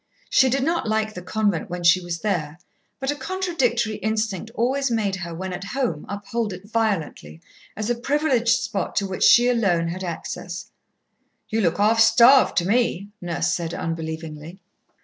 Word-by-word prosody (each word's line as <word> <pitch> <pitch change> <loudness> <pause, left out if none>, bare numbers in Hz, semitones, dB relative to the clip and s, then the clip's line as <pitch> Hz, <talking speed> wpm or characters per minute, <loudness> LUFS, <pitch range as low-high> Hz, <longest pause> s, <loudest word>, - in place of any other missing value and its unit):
She 265 - +5
did 265 +1 0
not 330 -6 0
like 215 0 0
the 180 - -7
convent 205 -2 -1
when 180 0 -5
she 175 +2 +5
was 170 -2 -5
there, 160 -7 -2 0.4
but 270 +1 -1
a - - -3
contradictory 265 - -1
instinct 220 -2 -2
always 265 +4 0
made 210 -5 0
her 170 -2 -6
when 185 +2 -5
at 185 +2 -6
home 230 - -3
uphold 205 +1 -3
it 185 +3 -11
violently, 195 - -2 0.4
as 215 0 -3
a 240 - +2
privileged 245 -2 +1
spot 215 -2 -3
to 200 - +1
which 190 -1 -5
she 240 +1 +7
alone 195 -9 +1
had 185 +3 -5
access. 175 0 -6 0.8
"You 225 +1 0
look 170 -5 +1
half 215 +3 +3
starved, 235 +4 +6
to 175 - +2
me," 205 -3 +1
Nurse 175 -1 -1
said 170 -1 -3
unbelievingly. 160 +1 -5
210 Hz, 170 wpm, -23 LUFS, 175-235 Hz, 0.8 s, she